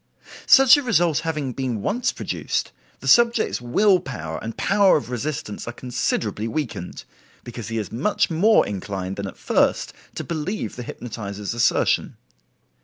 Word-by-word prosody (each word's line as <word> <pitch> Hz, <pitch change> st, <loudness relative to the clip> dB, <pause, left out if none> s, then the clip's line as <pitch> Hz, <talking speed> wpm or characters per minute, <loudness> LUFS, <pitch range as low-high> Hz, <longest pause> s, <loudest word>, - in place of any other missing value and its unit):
Such 270 Hz, +1 st, +8 dB
a -, -, 0 dB
result 175 Hz, -, +2 dB
having 150 Hz, -6 st, -3 dB
been 125 Hz, -5 st, -3 dB
once 240 Hz, +5 st, 0 dB
produced, -, -, -3 dB, 0.3 s
the -, -, -7 dB
subject's 235 Hz, -, +4 dB
will 185 Hz, -, +3 dB
power 80 Hz, -, -6 dB
and 115 Hz, 0 st, -6 dB
power 200 Hz, -1 st, +4 dB
of 130 Hz, -4 st, -6 dB
resistance 125 Hz, -4 st, -4 dB
are -, -, -3 dB
considerably 115 Hz, -3 st, -2 dB
weakened, 115 Hz, -, -4 dB, 0.4 s
because 120 Hz, -3 st, -7 dB
he 115 Hz, -, -3 dB
is 105 Hz, -, -4 dB
much 140 Hz, -, +1 dB
more 205 Hz, +7 st, +4 dB
inclined 95 Hz, -1 st, -4 dB
than 100 Hz, -1 st, -4 dB
at -, -, -9 dB
first -, -, +1 dB, 0.2 s
to -, -, -4 dB
believe 170 Hz, +6 st, -4 dB
the 125 Hz, -, -6 dB
hypnotizer's 105 Hz, -4 st, -6 dB
assertion. 120 Hz, 0 st, +1 dB
125 Hz, 150 wpm, -23 LUFS, 110-180 Hz, 0.4 s, Such